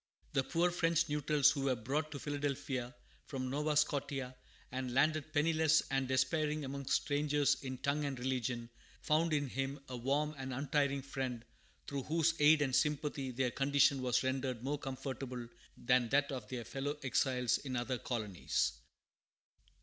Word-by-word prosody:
The 135 -2 +2
poor 175 +4 +1
French 165 -1 +2
neutrals 150 0 +4
who 140 -3 -2
were 130 -2 +2
brought 140 +7 -2
to 145 - -5
Philadelphia 140 -4 -3 0.3
from 130 -3 -3
Nova 150 +2 0
Scotia, 140 -3 0 0.4
and 130 -1 -3
landed 155 +2 +2
penniless 160 +1 +3
and 135 -1 +1
despairing 150 +3 +1
among 140 0 -5
strangers 145 +1 +2
in 130 -1 -5
tongue 140 +3 0
and 140 -2 -3
religion, 125 -2 -2 0.3
found 160 +2 +2
in 145 -2 +1
him 135 +2 -3
a 125 - -4
warm 140 +5 0
and 130 -1 -4
untiring 140 0 0
friend, 130 -3 -4 0.4
through 140 -1 -3
whose 165 +3 +2
aid 150 0 +6
and 130 -2 0
sympathy 150 -2 0
their 125 0 0
condition 140 0 +3
was 125 0 +1
rendered 130 -2 -2
more 145 +2 -1
comfortable 130 -2 -5 0.3
than 125 -1 +2
that 140 +2 +2
of 130 -2 -5
their 120 -3 -4
fellow 145 +2 -3
exiles 125 -1 +1
in 130 -3 -5
other 120 +1 -1
colonies. 105 -7 -1
135 Hz, 155 wpm, -35 LUFS, 130-150 Hz, 0.4 s, aid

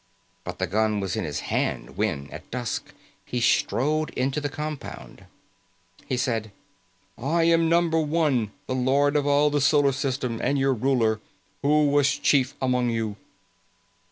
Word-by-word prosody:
But - - -6
the - - 0
gun 110 +1 +1
was 95 -2 -2
in - - -2
his 75 -2 -3
hand - - -2
when, 70 0 -1
at - - -10
dusk, 120 -3 -4 0.3
he 125 - -3
strode 150 +6 +1
into 135 +3 -1
the 145 - -2
compound. 150 -1 -7 0.8
He 130 - -1
said, 115 -4 -1 0.7
"I 160 +7 +1
am 165 0 +3
Number 170 -1 +3
One, 150 -8 +1
the 130 - -3
Lord 135 +3 +2
of 145 -1 +1
all 145 +1 +4
the 145 0 +1
Solar 145 0 +4
System, 130 -3 -2
and 140 - +1
your 135 0 +2
ruler. 115 -3 +1 0.4
Who 150 +1 +3
was 145 -1 +3
chief 135 -2 +2
among 125 -2 +1
you?" 115 -3 -2
135 Hz, 155 wpm, -25 LUFS, 120-150 Hz, 0.8 s, all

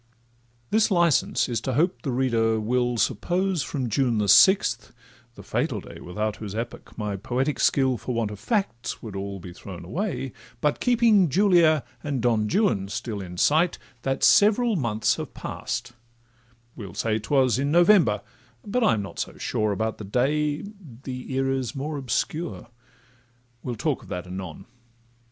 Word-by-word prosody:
This 220 0 +3
licence 175 -6 +2
is 115 -3 -2
to 130 - -2
hope 170 +8 +1
the 150 - -4
reader 115 -3 +1
will 120 +2 0
Suppose 175 - 0
from 135 -2 -3
June 120 0 +1
the 105 -1 0
sixth 190 - +5 0.4
(the - - -11
fatal - - -1
day, - - -11
Without 105 +4 -3
whose 105 -2 -7
epoch 115 +2 -6
my 105 -2 -2
poetic 130 +8 -2
skill 130 -3 +2
For 125 +4 -4
want 115 -3 -1
of 105 - -8
facts 195 - -2
would 110 -4 -7
all 100 0 -5
be 90 0 -10
thrown 90 0 -9
away), 175 - -3 0.3
But 150 +2 0
keeping 230 -7 +4
Julia 170 -4 +4 0.2
and 145 -3 -2
Don 115 -3 +1
Juan 190 - +2
still 110 0 -4
In 90 -1 -8
sight, 160 - +3 0.2
that 135 +1 -2
several 220 +2 +5
months 115 - 0
have - - -7
pass'd; 115 +1 -5 0.8
we'll 100 -6 -9
say 110 -1 0
'Twas 130 +2 +2
in 140 +1 0
November, 170 - +4 0.4
but 245 +4 0
I'm 110 - +2
not 95 - -9
so - - -4
sure 110 -1 -1
About 110 +3 -2
the - - -6
day—the 140 - -3
era 135 0 0
's 125 - -6
more 145 +2 -3
obscure. 140 +3 -3 0.9
We'll 125 - -4
talk 135 +5 -1
of - - -15
that 90 0 -4
anon. 90 -2 -7
130 Hz, 160 wpm, -25 LUFS, 110-160 Hz, 0.9 s, sixth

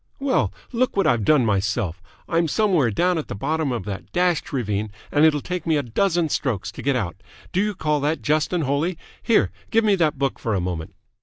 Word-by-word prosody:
"Well, 275 -1 +1 0.2
look 250 -2 0
what 195 - +3
I've 120 -3 +2
done 140 0 +4
myself! 100 -3 0 0.3
I'm 165 0 +1
somewhere 175 - +2
down 175 - +1
at 155 - -5
the - - -5
bottom 155 +6 -1
of 115 -6 -3
that 100 -1 -6
dashed 175 -2 +1
ravine, 105 -5 -2 0.2
and 150 +1 +4
it'll 150 -2 +3
take 180 0 -4
me 160 -2 +3
a 145 - 0
dozen 170 - +1
strokes 105 -9 -1
to - - -9
get 140 -1 +1
out. 95 -7 -2 0.3
Do 185 - +1
you 210 0 -1
call 150 -4 0
that 150 +3 -1
just 155 +1 +1
and 175 -3 0
holy? 145 +6 0 0.2
Here, 230 - +3 0.2
give 225 0 +3
me 210 -2 +4
that 155 -5 +1
book 135 0 -1
for 115 -3 -1
a - - +1
moment!" 90 -3 -4
150 Hz, 220 wpm, -23 LUFS, 110-175 Hz, 0.3 s, done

